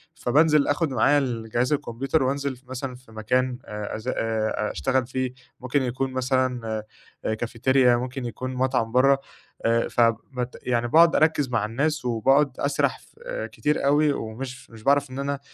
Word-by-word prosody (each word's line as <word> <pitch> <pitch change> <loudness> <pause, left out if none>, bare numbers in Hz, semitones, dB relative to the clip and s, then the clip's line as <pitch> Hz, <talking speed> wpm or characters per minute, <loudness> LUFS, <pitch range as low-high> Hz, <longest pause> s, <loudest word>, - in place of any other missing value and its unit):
فبانزِل 150 +3 +3
أخُد 145 +1 +1
معايا 135 +4 +3
الجهاز 120 0 -1
الكمبيوتر 135 +1 -1
وأنزِل 140 0 -1
في 125 - -22
مثلًا 130 0 -5
في 125 -2 -18
مكان 125 +3 0
آآ 105 -1 -5
أزا 115 +4 -3
آآ 110 -1 -1
أشتغل 125 - 0
فيه، 130 -1 -2 0.3
ممكن 130 +2 0
يكون 130 +2 -2
مثلًا 130 -2 0 0.6
آآ 110 - +1
كافيتيريا، 120 +2 +2
ممكن 125 +1 -4
يكون 130 +2 -5
مطعم 125 -3 0
برّا 135 +3 +5 0.5
آآ 115 0 +2
ف - - 0 0.4
بت 125 0 -3
يعني 120 -1 0
باقعد 165 +5 +6
أركّز 155 -4 +2
مع 115 -3 0
الناس 140 +5 -1
وباقعد 135 +5 +3
أسرح 140 0 0
ف - - -24 0.3
كتير 150 -1 -1
أوي 145 +1 +4
ومش 125 +3 -6
مش 110 -1 -14
باعرف 140 -1 +2
إن 130 - -6
أنا 140 0 -2
130 Hz, 160 wpm, -25 LUFS, 120-140 Hz, 0.6 s, باقعد